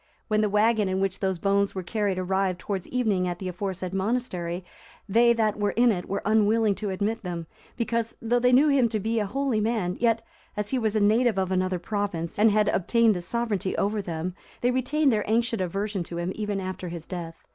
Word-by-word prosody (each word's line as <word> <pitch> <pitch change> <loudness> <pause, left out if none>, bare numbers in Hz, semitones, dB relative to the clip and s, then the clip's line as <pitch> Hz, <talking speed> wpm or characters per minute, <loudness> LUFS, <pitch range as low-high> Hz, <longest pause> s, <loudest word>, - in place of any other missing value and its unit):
When 215 0 +2
the 210 - +1
wagon 210 0 +3
in 185 0 0
which 195 0 -1
those 190 -2 0
bones 200 +2 +1
were 185 - -3
carried 200 0 -1
arrived 185 0 0
towards 195 -2 -4
evening 215 -8 0
at 175 -1 -3
the 185 - -5
aforesaid 185 0 -4
monastery, 190 -4 -2 0.4
they 235 +4 +5
that 215 -2 0
were 205 -1 +1
in 240 0 +5
it 180 -4 -4
were 200 - -2
unwilling 215 0 +3
to 210 - -3
admit 210 +4 -1
them, 175 -4 -5 0.3
because, 230 -1 -1
though 240 +2 +1
they 250 +1 +3
knew 275 +5 +5
him 265 -4 +3
to 220 -1 -1
be 225 +3 0
a 210 - -1
holy 265 -1 0
man, 210 -5 -1
yet, 230 -1 +1 0.3
as 210 0 -2
he 260 - +1
was 220 -2 0
a - - +3
native 220 +1 +3
of 190 -1 0
another 185 0 +1
province, 180 -2 -3
and 220 +1 +6
had 210 0 +2
obtained 225 +3 +3
the 180 - -3
sovereignty 210 -1 -2
over 205 +1 0
them, 175 -1 -4 0.3
they 245 - +3
retained 265 +2 +2
their 210 -1 +1
ancient 230 -1 +1
aversion 195 +2 -2
to 170 0 -6
him 175 +2 -2
even 210 -2 -2
after 185 -1 -5
his 170 -1 -7
death. 170 -3 -6
205 Hz, 215 wpm, -26 LUFS, 185-230 Hz, 0.4 s, and